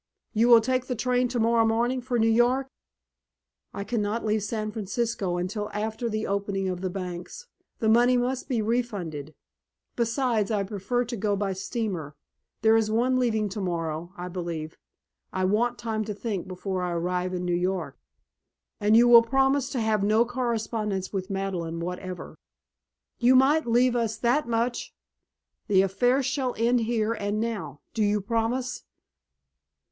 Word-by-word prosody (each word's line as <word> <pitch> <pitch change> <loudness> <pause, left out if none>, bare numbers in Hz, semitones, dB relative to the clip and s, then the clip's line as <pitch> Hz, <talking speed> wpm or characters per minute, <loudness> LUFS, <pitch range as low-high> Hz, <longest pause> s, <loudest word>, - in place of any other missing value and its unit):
"You 225 +1 +3
will 235 -2 +8
take 255 +2 -1
the 250 - -2
train 250 +2 +1
tomorrow 230 -1 +2
morning 235 +3 +1
for 245 0 -1
New 225 0 +3
York?" 240 +4 +3 1.0
"I 200 - -5
cannot 215 0 -2
leave 215 0 +1
San 215 +1 -3
Francisco 210 -3 -2
until 205 +4 -3
after 220 +3 -2
the 215 0 -2
opening 200 -1 -1
of 180 -1 -3
the 190 - -1
banks. 180 - -6 0.3
The 220 - -1
money 240 +3 +5
must 250 +3 -2
be 235 -4 0
refunded. 190 - -3 0.6
Besides, 235 -3 0
I 210 -3 +1
prefer 210 +5 -2
to 240 +1 -5
go 205 -1 0
by 195 -1 -1
steamer. 190 - -4 0.5
There 220 0 +6
is 220 -1 +2
one 250 +4 +2
leaving 220 -4 +1
tomorrow, 175 -4 -3
I 180 0 -5
believe. 170 -3 -5 0.6
I 185 0 0
want 235 +5 +1
time 220 -2 -2
to 210 -1 -4
think 205 -4 -4
before 185 0 -3
I 180 -1 -2
arrive 180 +2 -1
in 180 0 -3
New 175 - 0
York." 180 +2 -2 0.8
"And 210 +1 +4
you 240 +1 +6
will 235 -1 +9
promise 270 +2 +2
to 255 - -2
have 220 -2 +1
no 215 +3 +4
correspondence 225 -5 -2
with 190 0 -3
Madeleine 185 -4 -3
whatever?" 180 +1 -6 0.8
"You 245 +2 +5
might 275 +3 +4
leave 245 +1 +3
us 230 -2 0
that 250 +5 +1
much!" 235 +1 -1 0.7
"The 190 -2 +4
affair 245 +8 +2
shall 260 -1 -1
end 235 +2 +3
here 225 -1 0
and 205 -1 -2
now. 215 -11 -4
Do 225 - -1
you 210 0 +2
promise?" 230 +4 -1
220 Hz, 160 wpm, -26 LUFS, 190-240 Hz, 1.0 s, will